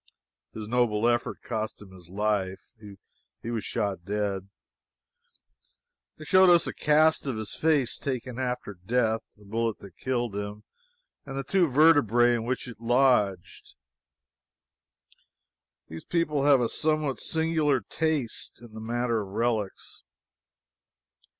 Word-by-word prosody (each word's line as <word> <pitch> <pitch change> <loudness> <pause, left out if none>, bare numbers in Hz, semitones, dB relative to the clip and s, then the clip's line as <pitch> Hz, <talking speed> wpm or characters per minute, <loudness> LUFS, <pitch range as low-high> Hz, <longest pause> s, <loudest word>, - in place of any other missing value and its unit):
His 110 -1 -6
noble 115 -2 +1
effort 120 0 -1
cost 110 0 -4
him 100 -2 -13
his 90 -2 -15
life. 100 -1 -1 0.8
He 115 - -4
was 115 -3 -2
shot 100 -6 -2
dead. 100 -1 -2 1.7
They - - -10
showed 185 -1 +6
us 175 -2 +5
a - - -3
cast 155 0 +3
of 130 -5 -2
his 110 -1 -5
face 150 -6 +1
taken 130 -2 -4
after 125 -5 -3
death, 115 +1 +1 0.2
the 105 - -18
bullet 115 +1 -1
that 95 -4 -14
killed 120 -5 -2
him, 105 +1 -5 0.6
and 135 -1 -7
the 135 - -2
two 185 +1 +2
vertebrae 125 -5 +5
in 115 -1 -2
which 130 +1 -2
it 115 -2 -10
lodged. 115 -7 +1 2.1
These 80 0 -9
people 150 -5 0
have 140 -3 +5
a 120 - +2
somewhat 155 0 0
singular 160 -4 +1
taste 150 +1 -3
in 120 -2 -14
the 110 - -8
matter 120 0 -1
of 100 - -7
relics. 110 -1 -3
120 Hz, 130 wpm, -27 LUFS, 105-135 Hz, 2.1 s, showed